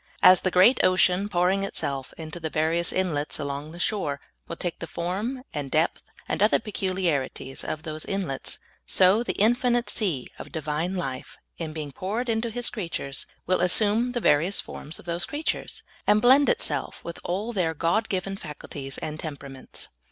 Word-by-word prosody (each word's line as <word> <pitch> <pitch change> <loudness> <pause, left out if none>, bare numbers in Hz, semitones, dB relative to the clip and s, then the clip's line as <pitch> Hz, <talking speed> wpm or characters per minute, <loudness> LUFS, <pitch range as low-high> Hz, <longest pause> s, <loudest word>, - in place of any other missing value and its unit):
As 185 -1 +9
the 185 - +1
great 185 +8 +6
ocean 185 +2 +4
pouring 185 +2 +2
itself 140 -8 -2
into 160 +1 -7
the 160 -1 -3
various 160 +2 +2
inlets 160 -6 0
along 145 +1 -4
the 170 - -10
shore 175 -7 -1 0.3
will 170 - -4
take 175 0 -4
the 165 - -5
form 205 +12 -3
and 145 -3 -3
depth 155 +4 +2 0.3
and - - -1
other 210 - +6
peculiarities 180 -11 -2
of 155 0 -4
those 155 -2 -4
in 195 -1 -1
lets, 135 -1 -3 0.3
so 190 +4 +5
the 240 - -1
infinite 240 +2 +3
sea 175 - -1
of - - -8
Divine 160 +3 -2
life, 135 -7 -4 0.2
in 160 -2 -3
being 155 -2 -5
poured 215 - -3
into 225 +1 +1
His 245 +2 -2
creatures, 165 - -4 0.2
will 185 0 +2
assume 215 +6 +3
the 240 - 0
various 170 0 +3
forms 155 +3 -6
of - - -12
those 170 +1 +1
creatures, 300 +2 -3 0.2
and 210 - +6
blend 265 +5 +6
itself - - -1
with 170 - -6
all 205 +7 -2
their 170 -5 0
God 175 +9 +1
given 195 +1 -2
faculties 145 -4 -7
and 155 0 -5
temperaments. 140 -4 -7
175 Hz, 175 wpm, -26 LUFS, 155-205 Hz, 0.3 s, As